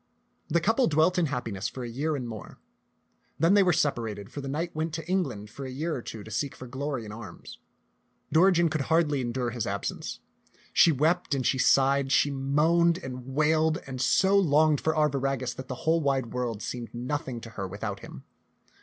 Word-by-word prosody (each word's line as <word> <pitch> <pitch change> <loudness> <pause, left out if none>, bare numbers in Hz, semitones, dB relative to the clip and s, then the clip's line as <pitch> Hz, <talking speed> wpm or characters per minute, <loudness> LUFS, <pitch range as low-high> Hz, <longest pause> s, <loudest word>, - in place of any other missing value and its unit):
The 170 - +3
couple 225 +9 +2
dwelt 160 +4 +3
in 165 - +2
happiness 120 -8 -3
for 130 - -7
a - - -4
year 145 +7 -2
and 125 -4 -4
more. 110 -5 -9 0.8
Then 165 +4 +4
they 205 - +6
were 185 -2 +4
separated, 115 - -1
for 145 - -6
the 135 - -6
knight 160 +5 -3
went 160 0 -2
to 160 -1 -6
Eng 190 +1 +2
land 105 -5 -8
for 140 - -8
a 130 - -5
year 155 +6 -3
or 125 - -4
two 110 -2 -8
to 110 - -11
seek 140 +4 -2
for 130 - -9
glory 130 -1 -4
in 105 - -8
arms. 105 - -10 0.7
Dori 185 +5 +6
gen 170 -1 +3
could 155 -2 -1
hardly 155 -4 +2
endure 120 0 -2
his 120 -1 -3
absence. 100 0 -4 0.5
She 170 - +6
wept 155 +2 +1
and 130 -2 -2
she 130 - +2
sighed, 135 +1 +3
she 145 - +3
moaned 160 +5 +2
and 130 -6 -7
wailed 155 +1 +3
and 130 -2 -5
so 190 +9 +3
longed 155 -5 +4
for 160 0 0
Arviragus 135 -4 0
that 130 - -8
the 125 - -7
whole 165 +1 +3
wide 135 -5 0
world 120 -4 -3
seemed 120 -1 -6
nothing 130 0 -3
to 115 - -10
her 100 -4 -5
without 100 +1 -5
him. 65 - -11
140 Hz, 205 wpm, -27 LUFS, 120-160 Hz, 0.8 s, they